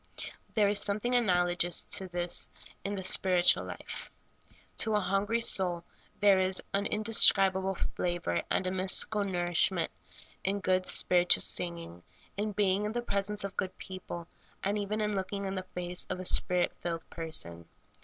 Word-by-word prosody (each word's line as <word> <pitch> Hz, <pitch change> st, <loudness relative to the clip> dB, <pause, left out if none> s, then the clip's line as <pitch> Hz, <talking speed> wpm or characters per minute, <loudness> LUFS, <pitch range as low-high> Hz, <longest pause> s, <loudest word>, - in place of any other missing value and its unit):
There 210 Hz, -2 st, +3 dB
is 205 Hz, 0 st, +3 dB
something 215 Hz, +5 st, 0 dB
analogous 175 Hz, -6 st, +2 dB
to 190 Hz, -, +2 dB
this 175 Hz, -1 st, +1 dB, 0.3 s
in 200 Hz, +1 st, -3 dB
the 190 Hz, -, -6 dB
spirit 185 Hz, -1 st, +3 dB
ual -, -, -7 dB
life. -, -, -9 dB, 0.7 s
To 220 Hz, -1 st, +1 dB
a -, -, +3 dB
hungry 200 Hz, +4 st, -1 dB
soul 180 Hz, -6 st, +2 dB, 0.4 s
there 200 Hz, -2 st, +4 dB
is 185 Hz, 0 st, +1 dB
an 200 Hz, +1 st, 0 dB
indescribable 195 Hz, -3 st, +4 dB
fla 175 Hz, 0 st, -3 dB
vor 85 Hz, -, -2 dB
and 185 Hz, -, -1 dB
a 185 Hz, -, -2 dB
mystical 190 Hz, +3 st, +3 dB
nourishment 175 Hz, -2 st, 0 dB, 0.5 s
in 200 Hz, +2 st, -1 dB
good, 185 Hz, -1 st, 0 dB
spiritual 180 Hz, -1 st, +3 dB
sing 175 Hz, -1 st, 0 dB
ing, 90 Hz, -, -12 dB, 0.3 s
in 210 Hz, +1 st, -3 dB
being 200 Hz, 0 st, 0 dB
in 210 Hz, -, -3 dB
the 240 Hz, 0 st, -3 dB
presence 205 Hz, -1 st, -2 dB
of 200 Hz, -1 st, -6 dB
good 185 Hz, -1 st, -4 dB
people, 185 Hz, -2 st, -8 dB, 0.4 s
and 205 Hz, +2 st, -1 dB
even 210 Hz, +2 st, -3 dB
in 210 Hz, 0 st, -1 dB
looking 200 Hz, +1 st, -4 dB
in 190 Hz, -, -4 dB
the 185 Hz, -1 st, -6 dB
face 180 Hz, 0 st, -4 dB
of -, -, -4 dB
a 185 Hz, -, -7 dB
Spirit 180 Hz, 0 st, +2 dB
filled 165 Hz, -1 st, -5 dB
person. 85 Hz, -, 0 dB
190 Hz, 165 wpm, -29 LUFS, 175-205 Hz, 0.7 s, there